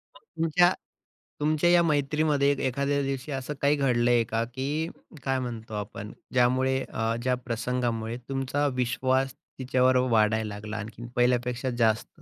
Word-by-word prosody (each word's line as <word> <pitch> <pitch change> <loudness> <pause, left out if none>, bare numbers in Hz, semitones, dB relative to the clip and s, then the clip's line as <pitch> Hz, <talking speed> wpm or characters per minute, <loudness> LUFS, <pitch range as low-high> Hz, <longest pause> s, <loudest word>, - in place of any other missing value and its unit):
मग - - -15 0.2
तुमच्या 175 +3 +4 0.7
तुमच्या 155 +3 +2
या 175 0 +6
मैत्रीमध्ये 150 -1 +2 0.2
एखाद्या 140 +2 0
दिवशी 135 +1 -3
असं 135 +1 -3
काही 140 +1 +4
घडलंय 120 -4 +3
का, 115 +1 -1
की 140 +7 -3 0.3
काय 135 -1 0
म्हणतो 115 -3 -6
आपण 105 0 -5 0.2
ज्यामुळे 130 +1 +3
अ, 115 +1 -1
ज्या 130 0 +2
प्रसंगामुळे 120 -1 -2
तुमचा 135 +2 0
विश्वास 130 +1 +1 0.3
तिच्यावर 130 0 +3
वाढायला 110 0 +3
लागला, 105 +1 -6
आणखीन 115 +2 -7
पहिल्यापेक्षा 125 +1 +1
जास्त? 110 -2 +2
130 Hz, 135 wpm, -27 LUFS, 115-140 Hz, 0.7 s, या